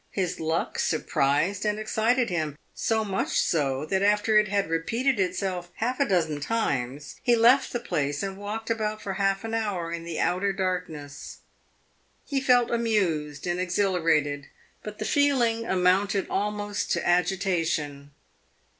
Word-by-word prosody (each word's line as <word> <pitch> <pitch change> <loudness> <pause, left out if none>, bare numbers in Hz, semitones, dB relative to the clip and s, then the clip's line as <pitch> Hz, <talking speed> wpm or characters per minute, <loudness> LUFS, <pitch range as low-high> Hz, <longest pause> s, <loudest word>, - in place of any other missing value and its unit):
His 185 -3 -2
luck 160 +1 -1
surprised 155 +5 +1
and 210 -1 0
excited 225 +2 +1
him 155 -4 -2 0.2
so 220 -1 0
much 195 -1 -1
so 140 -3 0
that 190 +4 0
after 210 +2 +3
it 210 - +1
had 200 0 0
repeated 230 +10 0
itself 185 -1 -1
half 250 +4 -2
a 280 - +3
dozen 160 -6 +1
times 145 - -2
he 240 -2 +4
left 240 +4 +5
the 240 - -2
place 145 -10 -2
and 195 -1 -3
walked 210 +3 -4
about 215 -1 -1
for 195 -2 -4
half 195 +1 0
an 225 0 -5
hour 200 -7 -2
in 170 0 -4
the 170 -1 -5
outer 195 +2 +1
darkness. 165 -7 -4 0.8
He 275 -2 -1
felt 245 -3 +4
amused 180 -11 0
and 175 0 -1
exhilarated, 165 -6 +1 0.3
but 210 0 -8
the - - -4
feeling 240 -6 +2
amounted 190 +2 +2
almost 205 0 -2
to 170 - -1
agitation. 175 -5 0
190 Hz, 145 wpm, -26 LUFS, 165-215 Hz, 0.8 s, left